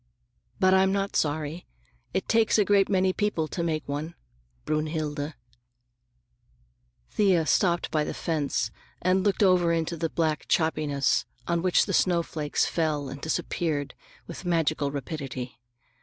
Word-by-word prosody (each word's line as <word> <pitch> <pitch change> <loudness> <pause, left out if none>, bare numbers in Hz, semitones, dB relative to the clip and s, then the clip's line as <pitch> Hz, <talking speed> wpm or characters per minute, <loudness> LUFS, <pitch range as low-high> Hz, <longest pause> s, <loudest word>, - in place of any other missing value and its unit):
But 185 0 +4
I'm 190 0 +4
not 200 0 -1
sorry. 155 +2 -1 0.4
It - - -2
takes 225 -1 +3
a 210 - +4
great 200 0 +3
many 185 -1 +2
people 205 -7 0
to 175 - -3
make 160 -3 -2
one—Brünnhilde." 145 - -4 1.8
Thea 185 -6 +3
stopped 175 +1 +2
by 155 -1 +1
the - - -4
fence 155 -5 -1 0.3
and 185 +1 +3
looked 205 +1 +2
over 180 -3 +4
into 165 0 0
the 165 0 -2
black 160 -2 -1
choppiness 150 -4 +1 0.2
on 170 -1 +1
which 180 0 +3
the - - -3
snowflakes 165 -4 +1
fell 150 -4 -1
and 135 +1 -8
disappeared 160 -3 -2 0.3
with 170 - -8
magical 160 -4 +1
rapidity. 135 -3 -5
160 Hz, 130 wpm, -27 LUFS, 145-180 Hz, 1.8 s, But